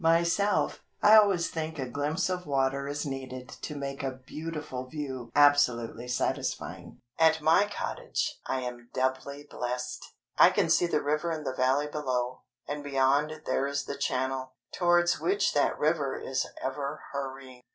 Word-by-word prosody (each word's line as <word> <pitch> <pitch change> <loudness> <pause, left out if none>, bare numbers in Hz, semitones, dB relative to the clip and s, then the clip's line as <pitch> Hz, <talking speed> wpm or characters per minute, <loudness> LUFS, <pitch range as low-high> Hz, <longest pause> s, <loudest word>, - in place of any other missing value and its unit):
Myself, 170 +5 +2 0.2
I 215 - +8
always 200 -5 +5
think 160 0 -4
a 130 -2 -3
glimpse 145 +7 -1
of 180 -2 -3
water 135 0 0
is 145 +1 -3
needed 130 -2 -6
to 150 - -5
make 140 -1 -4
a 130 -1 -4
beautiful 150 -5 -5
view 130 -4 -5
absolutely 125 -5 +4
satisfying. 125 - -3 0.2
At 160 0 +5
my 165 +6 +4
cottage - - -3
I 130 - -1
am 120 -1 -6
doubly 130 +2 -1
blessed! 125 -1 -4 0.4
I - - +9
can - - +1
see 175 - +4
the 150 -3 0
river 150 +4 0
in 155 -2 -3
the 130 - -2
Valley 130 +3 +2
below, 130 -4 -2 0.3
and 145 0 -4
beyond 145 +3 +1
there 135 - +1
is 140 0 -2
the 140 - -4
Channel, 130 -1 -2 0.2
towards 175 -1 +3
which 395 +2 +1
that - - +2
river 150 -3 0
is 130 - -2 0.2
ever 140 +1 -3
hurrying. 135 -2 -6
140 Hz, 155 wpm, -29 LUFS, 130-155 Hz, 0.4 s, I